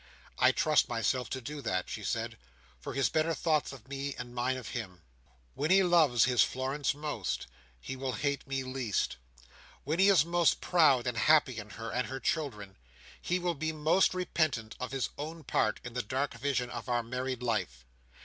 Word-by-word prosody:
"I - - +6
trust - - +2
myself 120 +2 0
to 140 +3 -5
that," 95 -7 -1
she - - -6
said, - - -3 0.4
"for - - -7
his 135 - +3
better 160 +1 +1
thoughts 155 -3 +1
of 135 -3 -12
me, 140 0 -4
and 120 -1 -7
mine 125 +2 0
of 125 - -7
him. 95 -8 -6 0.5
When 150 +3 -2
he 190 +1 +6
loves 160 - +5
his 125 -1 +3
Florence 135 +3 -1
most, 145 - -3 0.3
he 130 - -6
will 130 -1 -3
hate 140 +5 -2
me 135 -1 -2
least. 130 - -2 0.7
When 155 +5 -1
he 195 +1 +6
is 175 -7 +5
most 170 -1 +3
proud 150 -8 +4
and 125 -2 -2
happy 135 -2 +4
in 105 0 -8
her 115 0 -5
and 125 +1 -1
her 135 0 -5
children, 115 -10 -3 0.4
he 180 - 0
will 175 -1 -1
be 160 +1 -2
most 160 +5 +3
repentant 155 -11 -1
of 125 - -4
his 135 -2 -1
own 160 +2 -6
part 110 - +1
in 120 - -7
the 125 - -1
dark 135 +3 -2
vision 125 0 -1
of - - -6
our 120 -1 +1
married 125 +1 -3
life. 80 - -2
130 Hz, 190 wpm, -31 LUFS, 120-155 Hz, 0.7 s, I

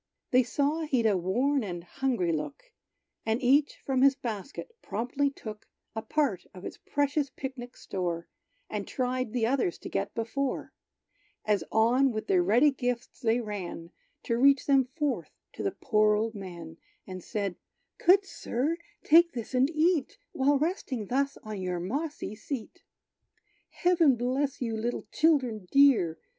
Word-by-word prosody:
They 255 - +6
saw 285 +6 0
he'd 255 -6 +1
a 210 -3 +4
worn 245 +10 +1
and 175 -4 -5
hungry 225 -3 -1
look; 285 - -5 0.5
And 225 +1 0
each 275 +3 +3
from 265 -2 +1
his 275 0 +6
basket 240 - -6
promptly 250 +6 -1
took 215 -6 -9 0.3
A 220 - -2
part 275 - -1
of 180 - -10
its - - -7
precious 285 0 0
pic 265 0 -6
nic 245 -1 -9
store, 175 -3 -3 0.4
And 205 -2 -4
tried 255 -2 -1
the 235 -1 +1
others 240 -8 +1
to - - -8
get 95 - -2
before, 250 +4 -2 0.7
As 210 -2 +2
on 245 +5 +4
with 215 -1 -4
their 185 -2 +3
ready 235 +11 +4
gifts 245 -2 -3
they 235 0 +2
ran, 185 -6 -6 0.3
To 230 0 0
reach 275 +1 +5
them 270 -2 +4
forth 285 +2 -2 0.2
to - - -7
the - - +1
poor 215 -1 +2
old 220 +2 -1
man; 170 -5 -8 0.3
And 185 -2 -8
said, 200 -4 -3 0.5
"Good 385 +3 +6
Sir, 300 -2 -2 0.3
take 340 +2 +6
this 235 +1 -6
and 260 +2 +3
eat 320 -1 +1
While 280 +2 +3
resting 275 - -2
thus 275 +2 0
on 215 -3 -5
your 180 -1 -2
mossy 280 - -3
seat." 225 +2 -6 0.9
"Heaven 335 -6 +3
bless 260 +4 -1
you, 225 -2 -2
little 235 +2 -3
children 255 - +2
dear!" 260 - +5
245 Hz, 155 wpm, -29 LUFS, 210-280 Hz, 0.9 s, They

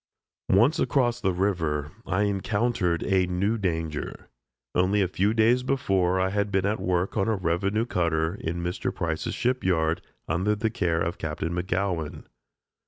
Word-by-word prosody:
Once 115 +11 +4
across 120 -3 +1
the 95 - +2
river 80 -6 -1 0.2
I 95 +2 +1
encountered 100 -2 0
a 95 -2 +2
new 100 +5 0
danger. 80 -5 -3 0.4
Only 95 +3 +3
a - - +1
few 95 +3 +1
days 115 +3 +4
before 95 -9 +1
I 95 0 +2
had 100 0 0
been 95 -1 +1
at 105 +2 0
work 90 +3 0
on 95 - +2
a 110 - +2
revenue 95 +5 0
cutter, 80 -5 0
in 85 -3 -4
Mr. 90 +1 -2
Price's - - -2
ship 125 +1 0
yard, 80 -2 +1 0.3
under 95 +7 +1
the 110 +1 -1
care 85 -8 0
of 85 +1 -2
Captain 80 +1 -3
McGowan. 90 -3 -2
95 Hz, 160 wpm, -26 LUFS, 85-105 Hz, 0.4 s, Once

